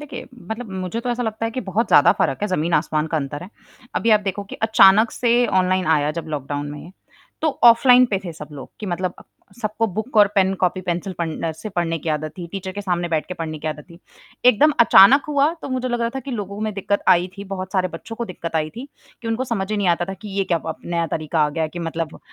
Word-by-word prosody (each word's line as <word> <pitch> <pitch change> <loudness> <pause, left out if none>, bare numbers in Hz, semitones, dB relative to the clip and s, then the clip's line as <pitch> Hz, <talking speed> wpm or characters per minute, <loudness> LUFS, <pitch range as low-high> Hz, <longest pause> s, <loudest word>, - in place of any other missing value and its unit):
देखिए, 290 -4 -8 0.2
मतलब 220 -1 -5
मुझे 190 +4 -4
तो 245 +1 -3
ऐसा 240 +1 -1
लगता 220 -1 -3
है 225 - -1
कि 255 +3 -4
बहुत 220 +5 +1
ज़्यादा 145 - +6
फ़र्क 135 - +1
है, 210 - +2
ज़मीन-आसमान 155 -3 0
का 160 - -2
अंतर 145 0 -4
है, 185 - -10 0.4
अभी 230 - +1
आप 215 - +6
देखो 200 0 -3
कि - - -10
अचानक 220 0 +6
से 240 0 +2
ऑनलाइन 185 0 +1
आया 150 -2 +2
जब - - -14
लॉकडाउन 145 0 -4
में, 150 +4 -9 0.5
तो 320 - +3 0.2
ऑफ़लाइन 245 +2 +7
पे 195 - +1
थे 175 - -5
सब 150 -2 -10
लोग 140 -2 -9
कि 210 - -5
मतलब 180 0 -2
अ, - - -12 0.4
सबको 215 +1 -1
बुक 220 +5 -5
और 205 -1 +8
पेन, 195 -1 +3
कॉपी-पेंसिल 180 0 -1
पन 165 -1 -2
से 215 - -7
पढ़ने 170 -4 -1
की 160 - -6
आदत 155 0 -1
थी, 175 - -5
टीचर 190 -1 -5
के 205 - -5
सामने 175 -3 -1
बैठ 160 -2 -1
के 180 - -4
पढ़ने 160 -2 -5
की 155 - -4
आदत 150 -1 -6
थी, 170 - -14 0.5
एकदम 250 +5 +5
अचानक 235 +4 +7
हुआ 290 +1 +2
तो - - -5
मुझे 255 -1 -2
लग 240 -1 -1
रहा 230 0 0
था 270 - -3
कि 270 - -8
लोगों 205 -4 -5
में 215 0 -2
दिक्कत 200 +1 -1
आई 175 +1 +5
थी, 200 - -6
बहुत 185 0 -6
सारे 185 -2 +1
बच्चों 200 +7 -9
को 235 - -3
दिक्कत 165 -5 -5
आई 155 0 -1
थी 265 +4 -7 0.3
कि 230 - -4
उनको 225 +3 -1
समझ 215 -5 -3
ही 215 - 0
नहीं 200 -3 +1
आता 170 0 +2
था 195 - -4
कि 215 - -7
ये 195 - +2
क्या 170 -2 0
अब 160 - -3
नया 170 -1 -1
तरीका 155 0 -2
आ - - 0
गया 160 +2 -3
है 160 - 0
कि 175 - -8
मतलब 165 -1 -4
190 Hz, 255 wpm, -21 LUFS, 165-225 Hz, 0.5 s, और